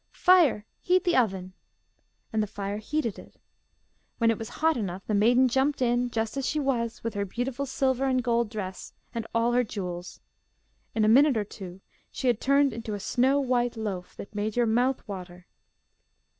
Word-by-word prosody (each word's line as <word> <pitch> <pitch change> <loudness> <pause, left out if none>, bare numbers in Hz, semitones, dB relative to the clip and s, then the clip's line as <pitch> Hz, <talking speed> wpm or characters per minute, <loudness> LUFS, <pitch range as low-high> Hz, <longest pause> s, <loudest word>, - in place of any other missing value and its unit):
'Fire, 335 - +4
heat 365 0 +2
the 350 -3 +2
oven.' 190 -6 0 0.8
And 220 - +2
the 210 - -1
fire 200 0 -4
heated 235 -1 -2
it. - - -15 0.8
When 230 -1 +3
it 225 - -3
was 225 - -6
hot 320 0 +1
enough, 195 -5 -4
the 215 - -2
maiden 240 +5 +4
jumped 265 +4 +1
in, 245 0 +1
just 225 +1 -2
as 275 - -1
she 305 - 0
was, 235 -5 -1
with 230 -1 -3
her 200 - -1
beautiful 245 +7 -3
silver 265 0 0
and 255 -1 +1
gold 235 -2 +1
dress, 190 -4 -6 0.2
and 230 -2 -4
all 230 +1 +3
her 250 +1 +3
jewels. 180 -5 -6 0.8
In 215 -1 +3
a - - +3
minute 265 +3 +5
or 215 - +1
two 190 -2 -10 0.3
she - - -6
had 240 -3 +2
turned 275 -1 +3
into 225 -2 -5
a - - -5
snow 255 +6 +2
white 245 -3 0
loaf, 195 -5 -5
that 200 - -10
made 210 +1 -2
your 240 -1 +3
mouth 245 +4 +1
water. 180 -3 -8
230 Hz, 185 wpm, -27 LUFS, 210-260 Hz, 0.8 s, minute